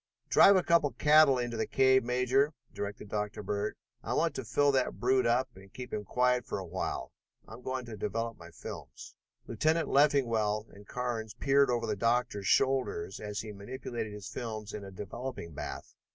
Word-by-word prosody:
"Drive 200 - +7
a 185 - +3
couple 170 -4 +3
of - - -22
cattle 150 -2 +6
into 120 -1 -2
the 110 - -1
cave, 130 -1 +4
Major," 125 +4 +2 0.2
directed 100 +1 -5
Dr. 105 0 -3
Bird. 100 +1 -2 0.3
"I - - -3
want - - +2
to - - -4
fill 145 0 +2
that 130 -2 0
brute 130 0 +3
up 125 +2 +2
and 95 0 -15
keep 125 +3 -8
him 105 - -3
quiet 125 +2 +1
for - - -3
a 95 - -5
while. 90 +2 -4 0.4
I'm - - -10
going 130 0 -3
to 115 -2 -7
develop 115 +3 -2
my 85 -3 -12
films." 80 - -9 0.3
Lieutenant 155 +8 +1
Leffingwell 115 -7 +2
and 100 0 -15
Carnes 120 -4 -3
peered 140 0 +3
over 120 -1 0
the - - -1
doctor's 115 -2 0
shoulders 130 -10 +1
as 105 -1 -4
he 110 - -7
manipulated 115 +2 -6
his 105 -1 -8
films 110 -3 -5
in 105 - -6
a 100 - -8
developing 105 0 -6
bath. - - -7
120 Hz, 185 wpm, -31 LUFS, 105-130 Hz, 0.4 s, Drive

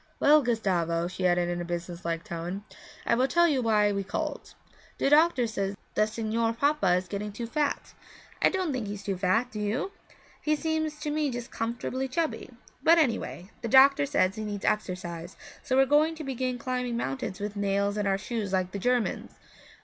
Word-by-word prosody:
'Well, 300 +1 +6
Gustavo,' 175 - 0
she 185 0 -1
added 175 0 +2
in 175 0 -2
a - - -2
business 175 0 -5
like 165 -1 -2
tone, 180 +1 -5 0.4
'I - - +2
will 250 +3 +3
tell 345 +5 +4
you 280 -5 +1
why 210 -3 +3
we 200 -1 -1
called. 195 - -4 0.4
The 275 - +1
doctor 305 -4 +5
says 200 -3 -2 0.2
the 215 - +3
Signor 225 +1 -1
Papa 230 -8 +2
is 180 0 -1
getting 205 +3 -4
too 230 +4 -5
fat. 285 +5 -2 0.5
I - - +6
don't 370 -6 -1
think 245 -5 -3
he's 205 0 -6
too 195 -1 -2
fat, 200 +7 +1
do 215 - -6
you? 220 - -1 0.5
He 305 0 +2
seems 315 -1 -1
to 300 -1 -2
me 300 -1 0
just 240 -2 -6
comfortably 245 +3 -3
chubby; 315 +5 -2 0.3
but 330 +4 +6
anyway, 230 - 0
the 235 - -3
doctor 275 +3 +6
says 275 -10 +2
he 215 - -3
needs 205 -2 -4
exercise, 180 -4 -2 0.3
so 260 - -1
we're 270 - +6
going 300 +4 +3
to 315 - -7
begin 255 -2 -2
climbing 250 -1 -2
mountains 155 - -3
with 205 0 -4
nails 200 0 0
in 210 -1 -1
our 195 -1 +2
shoes 210 -1 -4
like 185 -1 0
the 200 - -4
Germans. 245 +2 0
225 Hz, 195 wpm, -28 LUFS, 195-270 Hz, 0.5 s, Well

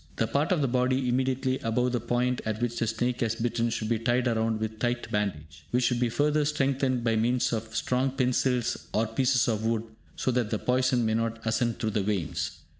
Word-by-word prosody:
The - - +1
part 145 +5 0
of 175 -5 +2
the - - +2
body 130 +1 +1
immediately 130 +1 0
above 125 +2 0
the 120 - 0
point 125 +1 0
at 110 -1 -2
which 120 -1 -1
the 115 - 0
snake 120 +3 -1
has 115 -1 +1
bitten 115 0 0
should 110 -1 -2
be 115 0 0
tied 120 +2 +1
round 115 -2 +1
with 110 0 -4
tight 120 0 -1
bandage, 80 -7 -3
which 125 +1 +1
should 120 0 +2
be 120 -1 +2
further 150 +4 +2
strengthened 135 -4 0
by 115 -1 +2
means 120 +3 +1
of 110 0 -4
strong 130 +2 +1
pencils 125 -2 0
or 110 - +2
pieces 125 +3 +2
of 110 -2 0
wood, 115 -1 0 0.3
so 130 - 0
that 120 -3 0
the 110 - 0
poison 125 0 +1
may 110 - +1
not 115 0 -1
ascend 115 +1 0
through 110 - -1
the 105 -1 0
veins. 100 -5 -2
120 Hz, 215 wpm, -28 LUFS, 110-125 Hz, 0.3 s, of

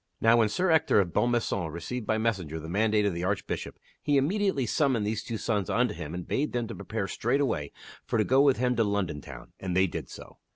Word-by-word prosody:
Now 115 +1 +5
when 110 -2 +3
Sir 180 - +1
Ector 160 -9 +4
of 90 -4 0
Bonmaison 115 -8 0
received 105 +9 -5
by 110 - +2
messenger 95 -9 -1
the 80 - -8
mandate 105 +3 +2
of 100 - +1
the 85 +1 -4
Archbishop, 100 +2 -3 0.2
he 145 -1 +2
immediately 180 -1 +1
summoned 125 -3 +1
these 105 0 -1
two 115 - -4
sons 105 -3 -1
unto 120 -2 +1
him 75 -2 -6
and 90 -1 -6
bade 150 +2 -1
them 120 -1 0
to - - -5
prepare 105 -3 -4
straightway 120 - -1 0.4
for - - 0
to 110 - +3
go 130 +5 +4
with 140 -2 +4
him 125 +1 +1
to 115 - +4
London 100 -7 -1
Town, - - -11
and 90 -1 -2
they 95 - +5
did 90 - -5
so. - - -12
110 Hz, 225 wpm, -28 LUFS, 95-125 Hz, 0.4 s, Now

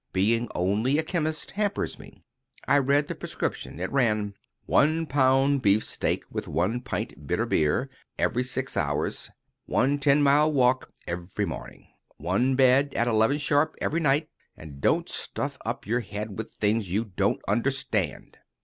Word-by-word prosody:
Being 115 +5 +2
only 105 +10 +1
a 160 - +1
chemist 155 -2 -2
hampers 205 0 -2
me." - - -15 0.4
I 145 - +5
read 140 +2 +2
the - - -3
prescription. - - -4
It 95 - -3
ran: 110 -6 +1 0.3
"1 160 +3 +3
lb. 135 0 +3
beefsteak, 105 0 +1
with - - -4
1 95 +10 0
pt. 125 - -5
bitter - - 0
beer 80 - +1 0.3
every 125 - +1
6 130 +1 -4
hours. 75 0 -1 0.4
1 140 +3 +2
ten 140 +1 +4
mile 145 +2 +4
walk 130 -2 +2
every 85 +2 -3
morning. - - -8 0.3
1 100 - +1
bed 135 +1 +4
at 120 - +1
11 115 +4 +3
sharp 145 +1 +1
every 165 - 0
night. 150 0 +2 0.3
And 70 -3 -11
don't - - +2
stuff - - -3
up - - -3
your 115 +4 +1
head 105 -3 -6
with 110 +1 -5
things 105 -2 0
you 105 +6 0
don't 95 -5 -1
understand." 110 - -1
125 Hz, 150 wpm, -26 LUFS, 105-140 Hz, 0.4 s, I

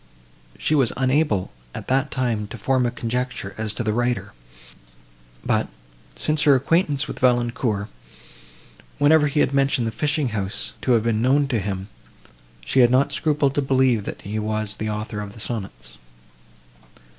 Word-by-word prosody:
She 155 - 0
was 135 -6 +3
unable, 130 -7 +1 0.2
at - - -7
that 135 +3 +1
time, 120 -6 -1
to 120 - -8
form 130 +3 +1
a - - +1
conjecture, 120 -4 -3
as 110 -1 -1
to 120 - -3
the 105 -1 0
writer, 120 -4 -1 1.1
but, - - +1 0.5
since 155 -1 0
her 145 -2 +6
acquaintance 145 +1 +1
with - - -7
Valancourt, 120 -4 +1 1.1
whenever 150 +1 +5
he 145 +1 +1
had - - +1
mentioned 135 -3 +2
the 115 - -1
fishing 145 +4 0
house 100 -3 -3
to 125 - +2
have 115 -2 +3
been 115 -2 +1
known 140 +3 +3
to 120 -5 +1
him, 95 -1 -4 0.8
she 135 - +1
had 120 -1 +7
not 130 +3 +3
scrupled 145 -3 +1
to 145 - +1
believe 130 -5 +2
that - - -7
he 105 +2 -3
was 110 0 -2
the 110 - -3
author 105 0 -4
of 100 -1 -7
the 115 - -12
sonnets. 95 - -6
120 Hz, 165 wpm, -23 LUFS, 105-135 Hz, 1.1 s, had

